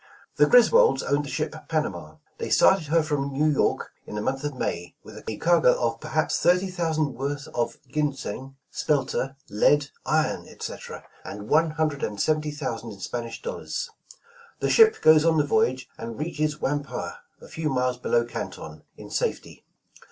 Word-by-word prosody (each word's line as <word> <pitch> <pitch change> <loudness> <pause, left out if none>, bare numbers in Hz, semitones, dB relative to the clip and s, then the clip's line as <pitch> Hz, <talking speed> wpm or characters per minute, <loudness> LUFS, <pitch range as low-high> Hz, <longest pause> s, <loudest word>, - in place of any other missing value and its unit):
''The - - +7
Griswolds - - +6
owned 145 +1 0
the - - -7
ship - - -2 0.2
'Panama'. 90 - -2 0.2
They - - -3
started 190 -5 +4
her 165 +1 +3
from 145 -2 -1
New 140 +3 +1
York 150 -3 +1 0.2
in - - -7
the 105 - -2
month 135 +5 -2
of 145 -2 -3
May, 90 -8 -3
with 110 0 -11
a 110 - -3
cargo 170 -7 +4
of 115 -1 -1
perhaps 155 +2 0
thirty 180 +2 +3
thousand 160 -5 0
worth 140 +2 -4
of 120 - -2
ginseng, 135 -2 -3 0.2
spelter, 135 -2 -1
lead, 140 +7 +2
iron, - - 0
etc., - - -8 0.2
and 105 +1 -8
one 160 +1 +4
hundred 155 -2 -1
and 105 -1 -3
seventy 155 +4 +1
thousand 120 -7 -5
in 100 - -14
Spanish 115 +4 -5
dollars. 485 - -4 0.7
The - - 0
ship 445 -1 +6
goes 155 -1 +7
on 165 -1 +3
the 150 - +4
voy 220 +10 +4
age 130 0 -5
and 115 0 -6
reaches 155 -1 -1
Whampoa, 140 -11 -2 0.3
a - - -13
few 160 -1 -3
miles 125 -2 0
below 120 -1 +1
Canton, 80 -9 -7 0.2
in - - -11
safety. - - -3
145 Hz, 170 wpm, -25 LUFS, 120-155 Hz, 0.7 s, The